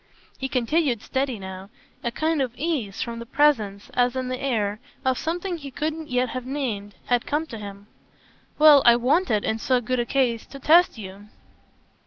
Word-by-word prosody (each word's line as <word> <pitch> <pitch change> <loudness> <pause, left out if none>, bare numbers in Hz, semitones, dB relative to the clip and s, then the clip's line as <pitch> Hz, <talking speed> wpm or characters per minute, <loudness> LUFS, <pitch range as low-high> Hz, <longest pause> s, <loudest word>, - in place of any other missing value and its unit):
He 265 - -3
continued 255 -1 +1
steady 265 -3 -1
now; 190 0 -8 0.3
a 235 - 0
kind 310 +5 0
of 250 -3 -2
ease 270 - -2
from 235 -1 -6
the 235 - -7
presence, 225 -9 +1
as 245 0 +2
in 255 -1 -2
the 255 0 -4
air, 215 -6 -1 0.3
of 260 -1 +1
something 350 +2 -2
he 285 -3 -8
couldn't 310 +3 -4
yet 250 0 +1
have 255 -1 -4
named 225 -8 -3
had 245 -1 +1
come 300 +2 0
to 230 -8 -8
him. 200 -1 -9 0.7
"Well, 300 -2 +8
I 235 - +7
wanted 245 - +1
in 220 - -1
so 255 +2 +2
good 250 +1 -2
a 240 - 0
case 245 -4 0
to 275 - -10
test 325 +2 +4
you." 200 0 -9
255 Hz, 185 wpm, -24 LUFS, 225-290 Hz, 0.7 s, Well